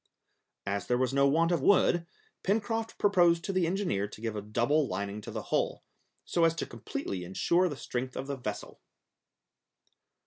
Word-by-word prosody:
As 100 -1 -2
there 125 - +2
was 130 +1 0
no 140 0 +4
want 165 +4 +3
of 170 -5 +1
wood, 175 0 +4 0.3
Pencroft 225 +3 -1
proposed 175 -4 +4
to 195 - -2
the 185 -3 +2
engineer 175 - 0
to 105 - -12
give 110 -1 -3
a 105 - -3
double 120 +8 +1
lining 100 -1 -4
to - - -9
the - - -5
hull, - - 0 0.4
so 170 - +1
as 165 0 +4
to 165 - -2
completely 100 -4 -5
insure 170 - +2
the 145 - -6
strength 125 0 -4
of 130 - -3
the 140 0 -3
vessel. 105 -6 -6
140 Hz, 175 wpm, -30 LUFS, 110-175 Hz, 0.4 s, no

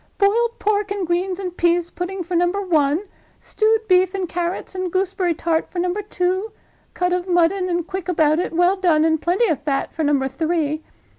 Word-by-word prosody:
"Boiled 465 +4 +2
pork 415 -1 0
and 400 -2 -2
greens 360 +2 -1
and 365 -2 -5
pease 345 0 +1
pudding, 360 +1 -4
for 350 +2 -7
Number 350 +3 +1
One. 320 -3 +1 0.4
Stewed 440 0 +1
beef 370 0 +3
and 380 -2 -2
carrots 345 +3 -3
and 370 -1 -3
gooseberry 370 -2 0
tart, 325 0 -1
for - - -9
Number 360 +3 0
Two. 380 +1 -2 0.4
Cut 360 0 0
of 360 0 -2
mutton, 360 +1 +2
and 345 -1 -1
quick 375 0 -5
about 315 -2 +3
it, 360 - -2
well 355 +3 +3
done, 330 -5 +3
and 320 -1 +1
plenty 365 +7 +2
of 300 -6 -1
fat, 280 -2 -2
for 320 - -2
Number 285 -2 +2
Three. 310 +2 -1
355 Hz, 195 wpm, -21 LUFS, 330-385 Hz, 0.4 s, beef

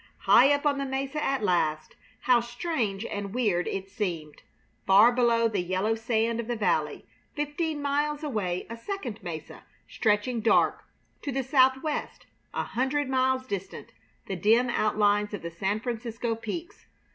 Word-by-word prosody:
High 265 +4 +6
up 285 +1 +1
on 285 -1 +2
the 275 - -1
mesa 270 +3 -3
at 270 -4 0
last, 155 -5 0 0.3
how 250 -2 +4
strange 240 - -3
and 205 0 -5
weird 205 -8 +1
it 195 0 -3
seemed! 170 -8 -4 0.5
Far 205 +5 +7
below 235 -2 +3
the 205 -4 -1
yellow 185 +5 0
sand 225 0 0
of 235 - -4
the 240 - -1
valley; 215 - 0 0.3
fifteen 295 0 -2
miles 295 +1 0
away 200 -11 -2
a 230 - -6
second 245 - -6
mesa 165 -4 -7 0.2
stretching 220 +2 0
dark; 225 - +3 0.4
to 285 - -3
the 270 +1 -1
southwest, 265 +3 +1 0.3
a - - -2
hundred 265 +3 -1
miles 260 0 +1
distant, 195 -5 -6 0.3
the 195 - -4
dim 225 +7 +3
outlines 210 -1 +1
of 195 - -9
the 170 - -5
San 195 +5 -1
Francisco 235 0 -3
peaks. 230 +10 -7
230 Hz, 155 wpm, -27 LUFS, 205-265 Hz, 0.5 s, Far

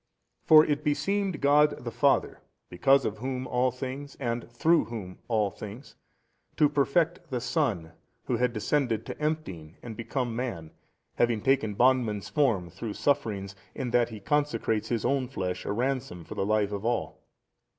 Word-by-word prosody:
For 155 0 +7
it 150 0 -1
beseemed 190 +3 0
God 145 0 +4
the 120 - -3
Father 130 +5 +2 0.3
because 135 +10 +3
of 105 0 -3
Whom 130 +1 -3
all 125 +1 +1
things 135 +3 -6
and 120 -3 -3
through 160 +8 +3
Whom 105 -6 -7
all 110 -4 +1
things, 110 +8 -10 0.6
to 150 - +5
perfect 155 +4 +1
the 125 -3 -2
Son 120 - -1 0.3
Who 120 - -1
had 125 +1 +1
descended 115 0 0
to - - -7
emptying 95 - -3
and 115 -2 -7
become 120 0 -3
man, 95 -11 -4 0.5
having 120 -2 +2
taken 120 -6 +2
bondman's 120 -4 +2
form, 110 - +1
through 105 +4 -5
sufferings 100 -9 0 0.2
57 - - -16
in 120 - -3
that 120 0 +3
He 110 -2 -8
consecrates 115 -6 0
His 115 -3 -1
own 135 -2 +1
flesh 90 -4 -4
a - - 0
Ransom 120 -6 -2
for - - -8
the 95 - -2
life 105 -1 +1
of 100 0 -4
all. 120 +1 -2
120 Hz, 165 wpm, -28 LUFS, 105-140 Hz, 0.6 s, For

